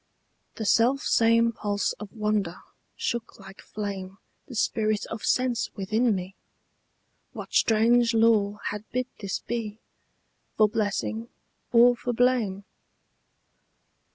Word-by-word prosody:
The 220 - -4
self 245 +6 +3
same 230 0 +3
pulse 205 -2 -2
of 210 -2 -8
wonder 210 -5 -1 0.4
shook 235 -1 -4
like 195 0 -13
flame 195 -2 -6 0.3
The 255 - -9
spirit 215 -1 0
of 225 - -6
sense 250 -2 +1
within 215 +3 +1
me: 185 +1 -5 1.0
what - - -8
strange 230 +1 +3
law 215 -2 +3
Had 210 0 -5
bid 255 0 -1
this 195 -3 -4
be, 220 -3 -4 0.8
for 215 - +6
blessing 220 +2 -2 0.4
or 245 +1 +6
for 245 +1 -3
blame? 230 -5 +1
220 Hz, 115 wpm, -26 LUFS, 205-235 Hz, 1.0 s, for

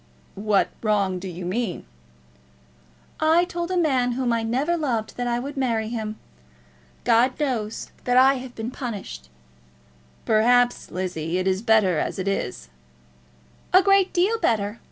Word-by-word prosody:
"What 205 0 +1
wrong 200 -4 +1
do 190 - -7
you 180 0 -7
mean?" 195 0 -3 1.3
"I 325 +3 +4
told 345 -1 -4
a 370 - -1
man 260 -7 +2
whom 245 -1 0
I 230 - 0
never 260 +9 0
loved 245 -9 -2
that 245 0 -3
I 240 0 0
would 280 +4 -5
marry 230 -5 -1
him. 220 -2 -4 0.9
God 250 +4 +3
knows 235 -7 -2
that 245 0 +2
I 265 +1 +7
have 250 -1 -10
been 225 +2 -5
punished." 200 - -7 1.0
"Perhaps, 245 +3 +3
Lizzie, 175 -2 -3
it 185 - -1
is 190 +1 +1
better 215 -7 +3
as - - -2
it 190 0 -3
is." 125 - -3 1.0
"A 370 +1 +7
great 390 -1 +4
deal 400 +6 +1
better. 210 -1 0
235 Hz, 150 wpm, -24 LUFS, 200-265 Hz, 1.3 s, I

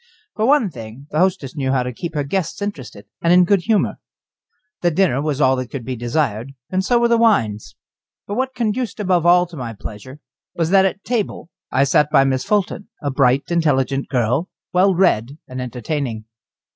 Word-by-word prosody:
For 220 +1 +1
one 270 -9 +3
thing, 115 +2 -10
the 150 - 0
hostess 180 -8 0
knew 135 -3 -1
how 130 -2 +1
to 125 0 -5
keep 165 +6 -6
her 145 - 0
guests 170 +3 -2
interested 140 - -6 0.2
and 170 - +2
in 180 +1 +7
good 195 +1 +3
humour. 220 -2 +1 0.8
The 175 - +3
dinner 165 -5 +1
was 150 -2 -2
all 130 -2 +4
that 130 -1 -4
could 130 -5 -6
be 130 - -3
desired, 120 0 -2 0.2
and 185 0 0
so 240 +5 +2
were 235 0 +3
the 235 -1 +3
wines. 115 - +1 0.5
But 205 - -5
what 260 +3 -2
conduced 235 0 -2
above 180 -4 +1
all 175 +1 +6
to 175 -1 -13
my 120 -5 -5
pleasure 110 +7 -9 0.4
was 165 0 -1
that 195 -1 +5
at 190 +1 -2
table 220 -7 -3 0.2
I 135 - +3
sat 140 +1 +3
by 135 - +5
Miss 130 -1 0
Fulton, 205 -1 -1
a 145 -2 -2
bright, 135 +2 +2
intelligent 140 -5 +1
girl, 125 - 0 0.2
well 185 +1 +4
read 145 - +1
and 130 0 -6
entertaining. 125 -2 -4
150 Hz, 195 wpm, -20 LUFS, 130-190 Hz, 0.8 s, in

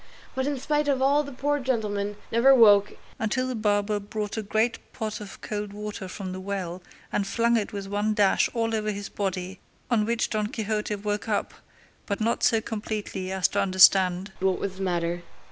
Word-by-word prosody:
But 260 +1 -1
in 290 -1 -1
spite 295 +2 0
of 275 -2 +2
all 280 +2 +4
the 280 - -8
poor 290 +3 0
gentleman 210 -6 -1 0.2
never 260 +4 +6
woke 205 -4 +6 0.3
until 255 +4 0
the 255 - -2
barber 210 -2 +1
brought 205 0 -4
a 220 - -2
great 220 +3 0
pot 215 -1 -4
of 200 -2 -9
cold 210 -1 -4
water 210 -2 -6
from 185 0 -6
the 185 - -5
well 185 -2 -4 0.3
and 200 - 0
flung 235 +4 +2
it 215 -3 0
with 200 -1 -5
one 205 +2 0
dash 200 -2 +3
all 225 -1 0
over 215 -1 0
his 205 -1 -4
body, 190 -1 -3 0.3
on 215 -3 +2
which 235 0 0
Don 215 -1 0
Quixote 215 -1 -2
woke 205 +2 -3
up, 205 - -1 0.5
but 200 - -2
not 225 +2 0
so 225 -2 +4
completely 210 -4 -4
as 190 -1 +2
to - - 0
understand 185 0 +5
what 190 -1 +1
was 190 -1 -4
the - - -7
matter. 175 -2 -1
210 Hz, 195 wpm, -26 LUFS, 195-225 Hz, 0.5 s, never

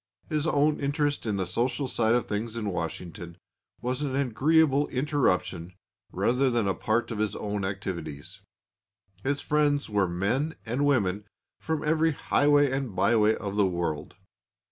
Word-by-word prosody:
His 155 -1 0
own 150 0 +2
interest 145 -2 -1
in 105 -2 0
the 95 - -1
social 120 +9 -1
side 115 -2 +2
of 120 - +1
things 110 +2 -3
in 105 -3 -2
Washington 85 0 -5 0.4
was 125 +3 -2
an 140 -3 -2
agreeable 140 +3 +3
interruption 95 - 0 0.4
rather 125 +8 +2
than 120 -4 +1
a 95 - +2
part 120 +2 -1
of 110 - -4
his 110 -1 0
own 105 -1 -3
activities. 95 -7 -5 0.8
His 140 +1 0
friends 145 -4 +1
were 100 -2 +2
men 115 - -1
and 130 +6 0
women 105 -7 +1 0.3
from 160 -1 -2
every 160 +1 +2
highway 145 0 +3
and 135 -7 -3
byway 105 +3 +3
of 100 -1 -5
the 100 -2 +4
world. 85 -4 -3
120 Hz, 150 wpm, -27 LUFS, 100-145 Hz, 0.8 s, the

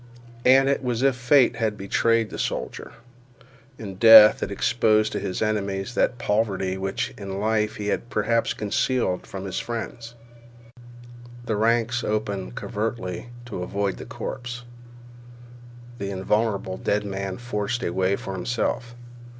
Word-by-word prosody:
And 135 +2 +6
it 140 0 +1
was 125 -1 -1
as 135 - +6
if 130 - -4
fate 125 +1 +4
had 110 -2 -1
betrayed 115 +3 +1
the - - -6
soldier. - - -4 0.9
In 100 -4 -8
death 110 0 +9
it - - -2
exposed 110 +1 +2
to - - -2
his 95 - -2
enemies 100 0 -2
that 125 - +1
poverty 100 -4 0
which 95 0 -3
in 100 -1 -5
life 110 0 0
he 105 0 -3
had 120 - -2
perhaps 115 +2 0
concealed 105 -2 -1
from 95 0 -7
his 95 - -3
friends. 115 0 -6 1.3
The 110 - -1
ranks 115 +2 +1
opened 100 - -2
covertly 105 -1 -4 0.2
to 110 -6 -6
avoid 100 +2 -2
the - - -8
corpse. 125 0 -6 1.4
The 100 0 -3
invulnerable 100 0 -1
dead 105 0 -1
man 95 -1 -4
forced 120 -1 -3
a 85 - -2
way 95 +1 +1
for 95 - -6
himself. 120 +4 -2
110 Hz, 140 wpm, -24 LUFS, 100-120 Hz, 1.4 s, death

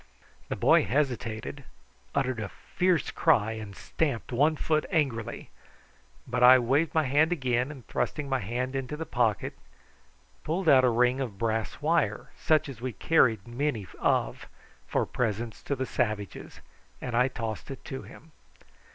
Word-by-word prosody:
The - - -1
boy - - +4
hesitated, 130 -1 -2 0.5
uttered 130 -4 0
a 105 -2 -4
fierce 180 -3 0
cry, 110 -10 +3
and 110 -3 -7
stamped 140 -2 -2
one 145 +6 +3
foot 155 0 +1
angrily; 135 - -1 0.7
but - - -2
I 125 +1 +9
waved 140 +6 +1
my 160 - +4
hand 150 +5 +3
again, 130 -5 0
and, 135 -5 -10
thrusting 150 -1 -2
my 135 -1 0
hand 125 +5 -3
into 135 +2 -3
my 160 - -3
pocket, 115 - 0 0.9
pulled 170 +3 -2
out 135 -4 +7
a 125 - +5
ring 125 +2 +2
of 115 -7 -4
brass 110 +5 -2
wire, 150 -10 +1
such 155 -1 +2
as 130 -5 -9
we 130 -1 -3
carried 115 - +2
many 120 -3 -2
of - - 0 0.4
for - - 0
presents 115 -1 -3
to 140 - -2
the 130 0 -2
savages, 105 -5 -3 0.4
and 125 -2 -4
I 125 +2 +4
tossed 115 -3 -5
it 135 - -8
to 135 -3 -5
him. 160 - -14
130 Hz, 155 wpm, -28 LUFS, 115-150 Hz, 0.9 s, I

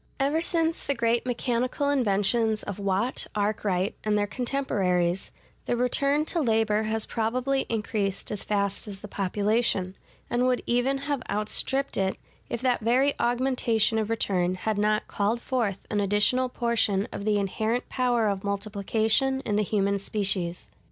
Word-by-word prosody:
Ever 285 +4 +1
since 330 -1 0
the 280 - +1
great 235 +1 +1
mechanical 250 +3 0
inventions 220 -2 +2
of 205 -1 -6
Watt, 200 +5 0
Arkwright, 205 -2 0
and 210 -1 +1
their 205 - +2
contemporaries, 195 -8 0 0.4
the 240 - 0
return 280 +4 +2
to 335 +1 +1
labor 220 -3 +2
has 220 0 -1
probably 255 +4 -1
increased 210 -3 -2
as 210 - -2
fast 200 0 -1
as 200 -1 -7
the 210 - -7
population; 200 -1 0 0.3
and 245 +1 +1
would 250 -1 +1
even 265 +3 0
have 285 -3 -1
outstripped 215 +6 0
it, 190 0 0 0.3
if 235 - -3
that 250 -2 +2
very 255 +6 +3
augmentation 240 -3 +2
of 215 0 -2
return 185 -5 +1
had 210 +2 -2
not 210 +1 +1
called 210 +4 0
forth 230 -6 -2
an 205 -1 +1
additional 210 +6 +2
portion 230 -5 +1
of - - -5
the 210 0 +2
inherent 220 +5 -1
power 245 -3 +1
of 195 -2 -1
multiplication 215 +6 0
in 210 - -2
the 210 - +3
human 200 -1 +1
species. 190 -4 -2
220 Hz, 150 wpm, -26 LUFS, 200-250 Hz, 0.4 s, very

